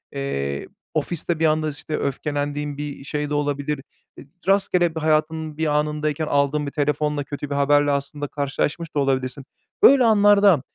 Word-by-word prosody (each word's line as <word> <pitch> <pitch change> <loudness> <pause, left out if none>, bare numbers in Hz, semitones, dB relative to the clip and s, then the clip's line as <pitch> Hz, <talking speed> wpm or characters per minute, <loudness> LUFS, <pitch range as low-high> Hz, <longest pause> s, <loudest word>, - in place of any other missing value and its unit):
eee, 70 - -3 0.3
ofiste 170 -1 -2
bir 165 - +2
anda, 155 0 +2
işte, 150 +1 -4
öfkelendiğin 145 +1 -3
bir 145 -1 -6
şey 150 +1 -3
de - - -3
olabilir, 145 0 -1 0.4
eee, - - -11 0.2
rastgele 180 -3 +2
hayatın 155 0 0
bir 160 - 0
anındayken 150 +1 -1
aldığın 145 +1 +1
bir 140 - -4
telefonla 150 0 0
kötü 145 0 -6
bir 140 - -2
haberle 145 +1 +3
aslında 145 +1 -3
karşılaşmış 145 +3 -3
da - - +2
olabilirsin. 135 -1 -1 0.4
Böyle 270 -1 +8
anlarda 205 - +5
150 Hz, 150 wpm, -22 LUFS, 140-155 Hz, 0.4 s, Böyle